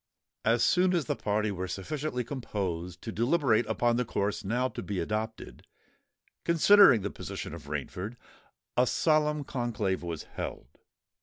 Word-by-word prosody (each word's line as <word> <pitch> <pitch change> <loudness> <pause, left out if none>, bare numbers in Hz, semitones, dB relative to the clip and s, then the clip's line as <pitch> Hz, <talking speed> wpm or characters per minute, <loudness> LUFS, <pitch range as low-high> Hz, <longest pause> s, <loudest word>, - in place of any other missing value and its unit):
As 115 +1 +3
soon 185 0 +4
as 165 -5 0
the - - -1
party 105 0 0
were 95 -1 -4
sufficiently 125 - -3
composed 95 - -4
to 115 - -4
deliberate 120 -1 +2
upon 120 -1 +1
the 125 - +2
course 100 -3 -2
now 120 +6 0
to 120 - -6
be 95 0 -3
adopted, 110 +5 -4 0.8
considering 170 - +7
the 100 - -3
position - - -6
of - - -9
Rainford, 105 +6 -4 0.6
a 125 +1 +4
solemn 150 0 +2
conclave 115 -8 -2
was 85 -3 -5
held. 60 - -7
115 Hz, 145 wpm, -29 LUFS, 100-135 Hz, 0.8 s, considering